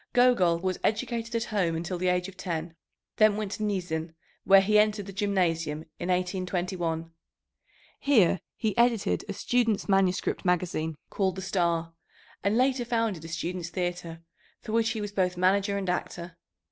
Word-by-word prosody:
Gogol 245 -9 +4
was 185 +1 -2
educated 230 +1 -1
at 230 - +1
home 175 -5 +1
until 175 +2 -3
the 185 - 0
age 180 0 +1
of 195 - -11
ten, 165 -3 -4 0.4
then 215 -1 +5
went 210 -2 -3
to 215 - -4
Niezhin, 170 -5 -2 0.3
where 195 0 +8
he 210 +2 +4
entered 210 -1 +2
the 195 - -8
gymnasium 170 -6 0 0.2
in 180 - -3
1821. 180 -2 -1 0.9
Here 210 - +3 0.2
he 220 -3 -1
edited 235 -3 +2
a - - -2
students' 225 +1 0
manuscript 195 -2 +1
magazine 165 -3 0
called 190 -3 0
the 190 - -6
Star, 170 -3 0 0.5
and 200 +3 +2
later 255 0 +2
founded 230 -8 -1
a - - -6
students' 170 +1 -4
theatre, 175 -2 -4 0.4
for 220 - -8
which 225 0 +2
he 220 -1 -3
was 205 -1 -4
both 185 -3 0
manager 200 +2 +2
and 195 -1 -3
actor. 175 -1 -3
185 Hz, 160 wpm, -28 LUFS, 175-210 Hz, 0.9 s, where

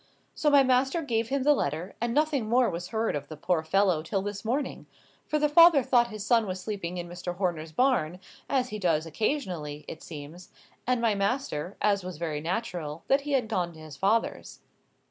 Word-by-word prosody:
So 300 - +1
my 285 -1 +6
master 265 +5 +2
gave 230 -4 -1
him 275 -1 0
the 295 +2 +6
letter, 165 - -2
and 235 0 0
nothing 285 -5 +1
more 245 +1 +3
was 175 +1 -5
heard 225 -4 -1
of 145 -1 -4
the 155 - -9
poor 170 +1 0
fellow 180 0 +2
till 190 +4 -2
this 205 0 -5
morning, 245 - -2 0.4
for 305 - +1
the 300 0 +3
father 320 -2 +7
thought 240 -1 +3
his 215 -3 -7
son 230 -1 +3
was 185 0 -4
sleeping 180 -2 -4
in 175 0 -4
Mr. 175 0 -6
Horner's 170 -4 -2
barn, 185 - +1 0.3
as 255 -2 +1
he 215 - -5
does 165 -4 +1
occasionally, 165 - -3
it 160 - -8
seems, 155 +3 -10 0.4
and 250 -1 +2
my 230 -2 +3
master, 200 - -2
as 200 -2 +2
was 180 -3 -6
very 155 -3 -3
natural, 170 -4 -3
that 275 +1 +4
he 290 0 -3
had 255 -5 +2
gone 180 -6 -1
to 160 - -14
his 155 -2 -10
father's." 210 +9 -1
200 Hz, 205 wpm, -28 LUFS, 170-250 Hz, 0.4 s, father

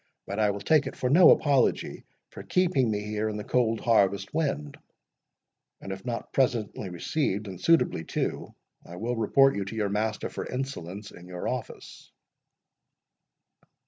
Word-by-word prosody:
But 100 +2 -4
I 105 -1 +3
will 100 0 -3
take 150 +4 +3
it - - -6
for 125 - -1
no 170 +3 +8
apology 140 -4 +2 0.3
for - - -9
keeping 170 -10 +1
me 105 -1 -1
here 105 +1 -2
in 105 - -4
the 105 - -5
cold 115 -2 +1
harvest 100 -4 +2
wind; 75 - -2 1.0
and 95 - -8
if 95 - -9
not 120 -2 -5
presently 115 -6 0
received, 100 - -2
and 95 -2 -8
suitably 165 - +3
too, - - -3 0.3
I 85 - -11
will 115 +6 -2
report 135 +5 +4
you 100 - -1
to 100 +3 -7
your 105 -2 0
master 105 +2 -1
for - - -5
insolence 105 -7 -5
in 85 +1 -13
your 90 -1 -5
office." - - -6
110 Hz, 160 wpm, -27 LUFS, 100-130 Hz, 1.0 s, no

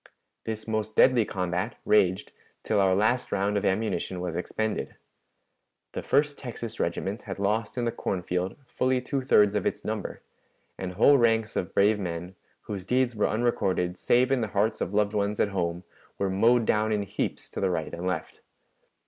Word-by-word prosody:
This 110 0 -5
most 110 -1 -2
deadly 125 -4 +5
combat 90 +4 -2
raged 95 -3 +3 0.3
till - - +1
our 95 -1 +4
last 110 +5 +1
round 100 +1 0
of 100 - 0
ammunition 95 -2 -1
was 90 -2 -3
expended. 110 +5 -3 1.0
The - - -4
First 145 0 +1
Texas 115 -3 -6
Regiment 95 +6 -2
had 95 - -4
lost 105 +4 -1
in 120 - 0
the 115 - +1
corn 95 -5 -3
field 90 +2 -2
fully 130 +1 0
two 135 +2 -2
thirds 105 -5 +4
of 105 -3 0
its - - -3
number; - - -4 0.5
and 90 -1 -5
whole 135 +9 +5
ranks 115 -1 +2
of 90 - -3
brave 105 +2 +4
men, 90 -1 -4 0.3
whose 100 -3 -6
deeds 125 +3 +1
were 105 - +2
unrecorded 95 -6 0
save 125 +2 +3
in 135 -2 +2
the 110 - 0
hearts 110 +2 +1
of - - -1
loved 105 0 +1
ones 105 0 -1
at 105 - +3
home, 90 -2 -2 0.3
were 100 -1 0
mowed 115 +4 +4
down 110 +1 +2
in 105 -1 +1
heaps 100 - -4
to - - -5
the 95 - +2
right 80 -4 -2
and 90 +2 -4
left. 90 - -4
105 Hz, 180 wpm, -27 LUFS, 95-115 Hz, 1.0 s, deadly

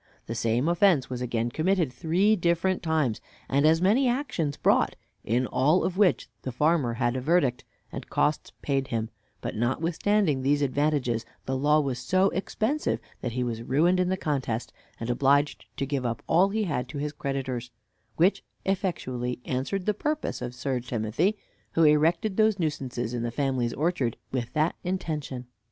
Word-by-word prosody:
The 115 - -4
same 115 +4 +1
offense 175 -6 +3
was 125 -1 -3
again 120 -1 -1
committed 165 -2 +1
three 180 - +2
different 175 +1 +1
times, 155 -9 0 0.3
and 140 +3 +3
as 165 +2 +4
many 235 +8 +4
actions 215 - -1
brought, - - +3 0.3
in 120 +4 +1
all 150 +9 +2
of 185 - -1
which 195 -3 +3
the 130 - -4
farmer 150 -1 +2
had 120 0 0
a 130 - -2
verdict, 140 -4 +2 0.3
and - - -7
costs 150 +1 0
paid 135 -2 0
him; 115 -2 -2 0.3
but - - -4
notwithstanding 160 - +1
these 145 +2 +2
advantages, 140 -4 +1 0.2
the 130 - -1
law 150 +3 +3
was 135 -5 -1
so 185 +9 +2
expensive, 220 - -1 0.2
that 120 - -3
he 125 +1 -1
was 115 -2 -3
ruined 165 +9 +2
in 180 0 +2
the 190 - 0
contest, 130 -8 -2 0.3
and 115 +1 -2
obliged 140 +3 +2
to 135 - -1
give 140 -1 -2
up 115 -2 -3
all 180 +4 +4
he 215 +2 0
had 135 -9 -2
to 145 - -6
his 145 +1 -3
creditors; 135 -4 -3 0.5
which 180 +5 +3 0.2
effectually 130 -11 -2
answered 140 +9 -2
the 210 - +2
purpose 300 - -2
of 125 0 -5
Sir 130 +1 -1
Timothy, 120 - 0 0.4
who 165 - +3
erected 165 +6 +3
those 215 -2 +4
nuisances 130 - -2
in 120 - -2
the 120 - -1
farmer's 125 -1 -1
orchard 150 -7 0
with 125 -3 -2
that 155 +2 +2
intention. 155 -8 -3
145 Hz, 170 wpm, -27 LUFS, 125-175 Hz, 0.5 s, as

